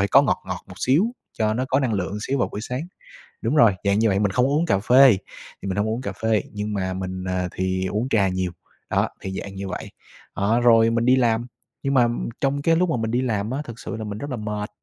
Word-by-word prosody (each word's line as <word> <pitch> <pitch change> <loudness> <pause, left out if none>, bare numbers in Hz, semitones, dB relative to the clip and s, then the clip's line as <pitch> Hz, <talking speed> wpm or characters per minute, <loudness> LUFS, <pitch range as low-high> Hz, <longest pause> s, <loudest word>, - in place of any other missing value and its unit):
phải 100 - +2
có 140 - +6
ngọt 140 - 0
ngọt 90 -1 -5
một 95 - -11
xíu 135 - +3 0.3
cho 110 -1 +1
nó 125 +3 0
có 135 +1 +2
năng 130 -4 0
lượng 95 +1 -2
xíu 135 +5 -1
vào 120 - +1
buổi 105 - -6
sáng. 125 +7 -4 0.6
Đúng - - 0
rồi, 115 -9 +6
dạng 100 +1 +2
như 115 - +3
vậy, 95 0 +1
mình 105 -1 +1
không 125 +5 +2
uống 150 +4 +1
cà 100 - +2
phê, 125 +1 +6 0.4
thì - - -5
mình 95 +1 -2
hông 105 - +1
uống 115 +3 -2
cà - - -4
phê, 110 -3 0
nhưng 105 0 -3
mà 95 -2 -2
mình, 95 0 -4
à, 90 -1 -1
thì 95 0 -1
uống 105 +7 -2
trà 100 -6 +3
nhiều. 95 -1 -2 0.4
Đó, - - +1
thì 95 - -5
dạng 100 -1 -8
như 95 0 -5
vậy. - - -6 0.4
Đó, 110 +4 +2
rồi 115 -1 +6
mình 115 0 +1
đi 130 +1 +5
làm, 120 -2 +1 0.4
nhưng 140 0 0
mà 125 -3 +5 0.3
trong 140 +1 +1
cái 165 +3 +3
lúc 180 +2 +2
mà - - +1
mình 110 -1 -2
đi 125 +2 +1
làm 110 -4 -1
á, 135 +3 -2
thực 115 -2 -9
sự - - -5
là 110 - -5
mình 105 -1 -5
rất 145 +6 -6
là 130 - -2
mệt, 105 -1 -4
110 Hz, 265 wpm, -23 LUFS, 100-130 Hz, 0.6 s, có